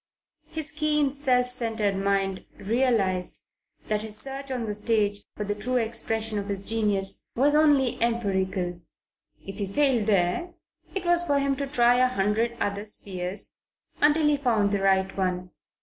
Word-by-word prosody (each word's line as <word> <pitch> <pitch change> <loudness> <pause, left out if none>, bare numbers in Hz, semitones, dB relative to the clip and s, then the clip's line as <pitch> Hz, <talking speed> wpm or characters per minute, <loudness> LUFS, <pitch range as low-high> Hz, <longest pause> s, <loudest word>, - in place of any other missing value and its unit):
His 315 -1 -5
keen, 300 -2 +1
self 255 -3 +1
centred 225 -5 -1
mind 195 -1 -1
realized 205 -5 0 0.5
that 210 -1 +1
his 215 -1 -5
search 275 +3 -6
on 250 -3 -2
the 210 - -2
stage 205 -1 +1 0.2
for 210 - -2
the 205 0 -1
true 250 +5 -3
expression 225 -2 0
of 200 - -5
his 200 -1 -1
genius 200 -2 0
was 280 +4 +3
only 290 -6 +3
empirical. 190 -6 -1 0.6
If 195 +2 -7
he 200 - -1
failed 245 -1 +2
there, 200 - +1 0.4
it 380 -2 -3
was 345 0 +3
for 290 -5 +1
him 275 0 +1
to 280 0 -2
try 245 -3 +4
a 255 0 +5
hundred 230 +1 0
other 200 +1 -2
spheres 190 -2 -5 0.4
until 300 +1 +4
he 295 -1 +3
found 225 -7 +1
the 200 -1 0
right 190 -1 +2
one. 180 -1 -2
220 Hz, 160 wpm, -26 LUFS, 200-265 Hz, 0.6 s, a